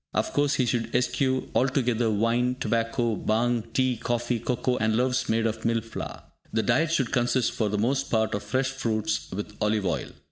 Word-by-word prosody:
Of - - 0
course, 145 0 +2
he 130 - +2
should 120 -1 -1
eschew 130 +1 +1
altogether 125 -3 +2
wine, 115 +4 +1
tobacco, 115 +1 0
bhang, 115 +1 0
tea, 130 -1 +1
coffee, 120 +1 -1
cocoa, 125 +2 0
and 110 0 +1
loaves 125 +1 +1
made 115 0 +2
of 110 0 -2
"mill 115 0 +1
flour." 115 +1 -7 0.3
The 110 - +1
diet 155 +7 +2
should 135 -7 +1
consist 120 0 +2
for 110 -2 -1
the 105 - -1
most 135 +6 0
part 110 -1 +1
of 100 - -1
fresh 130 +6 -1
fruits 110 -5 -1
with 105 +2 -5
olive 105 -1 +1
oil. 85 -3 -1
120 Hz, 185 wpm, -26 LUFS, 110-125 Hz, 0.3 s, course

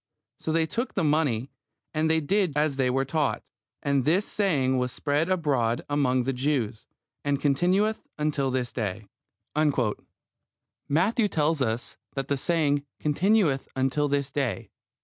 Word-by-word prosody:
So 160 - -3
they 165 0 +3
took 235 +10 -3
the 190 - +1
money, 145 -5 +1 0.4
and 155 0 +1
did 160 +2 +2
as 150 -2 +1
they 130 -2 +2
were 135 +2 +1
taught: 150 +1 0 0.4
and 140 -2 +2
this 175 +9 +2
saying 140 -11 +1
was 125 0 -1
spread 150 +6 0
abroad 135 -10 +1
among 130 -3 +2
the 135 +2 -1
Jews, 125 -4 -1 0.4
and 145 -1 0
continueth 185 +10 +1
until 150 -3 0
this 125 -2 -1
day. 105 -2 -3 1.8
Matthew 205 - +2
tells 155 -4 +1
us 115 0 -2 0.2
that 135 -1 -3
the 140 - +1
saying 145 -1 +1 0.2
"continueth 160 -2 +2
until 135 +3 +1
this 140 -1 -1
day." 130 -9 -2
145 Hz, 140 wpm, -26 LUFS, 130-160 Hz, 1.8 s, they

